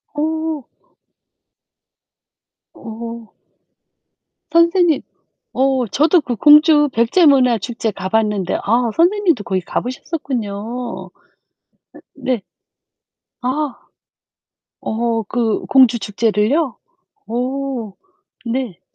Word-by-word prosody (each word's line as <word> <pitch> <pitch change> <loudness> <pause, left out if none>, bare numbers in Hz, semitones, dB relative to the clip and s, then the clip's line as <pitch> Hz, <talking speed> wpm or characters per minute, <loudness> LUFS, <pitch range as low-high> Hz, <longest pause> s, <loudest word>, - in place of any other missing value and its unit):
오. 315 -2 -2 2.0
어. 230 0 -9 1.2
선생님 335 -1 +3 0.5
어 260 -2 +1
저도 315 - +3
그 245 -4 -3
공주 295 +3 +6
백제 235 +10 +3
문화 255 -5 +5
축제 230 0 -3
가봤는데 200 0 -1
아 235 +2 +1
선생님도 345 - +2
거기 185 -1 -1
가보셨었군요. 240 - -4 1.1
네. 250 -5 -2 1.0
아. 265 +2 -2 1.1
어 230 0 -1
그 230 -3 -1
공주 250 -3 +5
축제를요? 220 +7 0 0.5
어 250 -2 -3 0.6
네. 235 -9 -3
245 Hz, 145 characters per minute, -18 LUFS, 225-295 Hz, 2.0 s, 공주